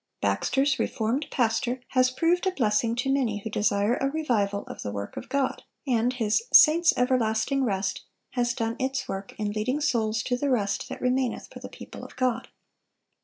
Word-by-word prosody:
Baxter's 270 0 +1
"Reformed 240 +6 -1
Pastor" 240 +1 0
has 255 -1 +3
proved 335 +8 +1
a - - +2
blessing 230 - +1
to 255 +3 0
many 245 -7 0
who 220 - -5
desire 205 +2 +1
a 270 - 0
revival 225 -10 0
of - - -9
the - - -4
work 100 0 -6
of - - -7
God, 280 -2 0 0.2
and 245 -2 +2
his 225 - +1
"Saints' 330 +2 +7
Everlasting 250 +1 +1
Rest" 195 -5 -1 0.3
has 240 -1 0
done 230 -1 -2
its 265 +1 -2
work 195 0 -6
in 210 -1 -2
leading 220 +7 -1
souls 225 -6 0
to 245 - 0
the 285 +2 -1
"rest 205 -6 0
that - - -7
remaineth 250 -1 -1
for - - -9
the - - -9
people - - -10
of - - -11
God." 255 -1 0
245 Hz, 180 wpm, -26 LUFS, 220-265 Hz, 0.3 s, Saints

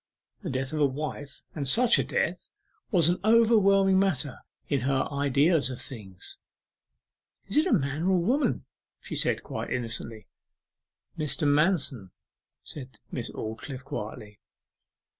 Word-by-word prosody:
The - - -4
death 130 +2 -3
of 155 - -1
a 145 - +5
wife, 140 0 -6
and 145 -4 -3
such 240 - +5
a - - +2
death, 485 0 -2 0.4
was 175 - +3
an 175 +1 +2
overwhelming 200 -4 +5
matter 145 -9 0 0.3
in 140 - +1
her 135 +2 0
ideas 140 +1 +3
of 130 - -6
things. 100 -8 -7 1.1
'Is 200 - -2
it 305 - +4
a - - 0
man 140 - +1
or 190 -1 +4
woman?' 245 - +1 0.3
she - - -8
said, - - +1
quite - - -5
innocently. 115 -2 -3 0.9
'Mr. 150 0 0
Manston,' 145 - +2 0.5
said 130 -6 -8
Miss - - -4
Aldclyffe 125 +5 -6
quietly. 105 -6 -7
145 Hz, 135 wpm, -27 LUFS, 130-190 Hz, 1.1 s, a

